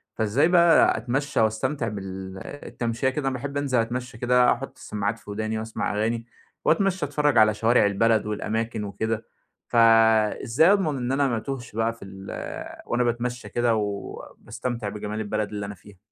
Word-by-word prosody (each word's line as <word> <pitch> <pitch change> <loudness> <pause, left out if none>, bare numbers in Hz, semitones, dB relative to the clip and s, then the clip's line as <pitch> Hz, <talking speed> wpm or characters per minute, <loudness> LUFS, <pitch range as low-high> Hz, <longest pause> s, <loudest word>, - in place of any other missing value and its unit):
فإزاي 110 +8 +2
بقى 170 -2 +5
أتمشّى 135 +4 -1
وأستمتع 115 +4 0
بال 95 -2 -6 0.3
التمشية 115 +2 -1
كده؟ 135 +1 -2
أنا 135 - 0
باحب 140 +3 -4
أنزل 135 -4 +1
أتمشّى 120 0 -3
كده 125 +1 +4
آحُط 135 +3 -8
السماعات 105 +2 -3
في - - -15
وداني 110 +1 -2
وأسمع 110 -1 -3
أغاني، 115 +2 -1 0.4
وأتمشّى، 185 -1 +2
أتفرّج 145 -2 +1
على 110 -1 +6
شوارع 115 +2 +3
البلد 110 +2 +2
والأماكن 110 +1 -2
وكده. 110 +2 -3 0.4
فإزاي 115 - +4
أضمن 180 -8 +1
إن 125 0 -2
أنا 140 +1 +2
ما 120 -3 0
أتوهش 120 -2 -6
بقى 115 +1 +1
في 115 - -12
ال 95 0 -11 0.6
وأنا 120 +1 +1
باتمشّى 120 +1 -2
كده 120 -1 +1
و 110 - +1 0.5
وباستمتع 120 -4 -5
بجمال 105 +1 -5
البلد 105 0 -2
اللي 100 -1 -4
أنا 100 0 -7
فيها؟ 100 +2 -17
115 Hz, 165 wpm, -25 LUFS, 105-130 Hz, 0.6 s, على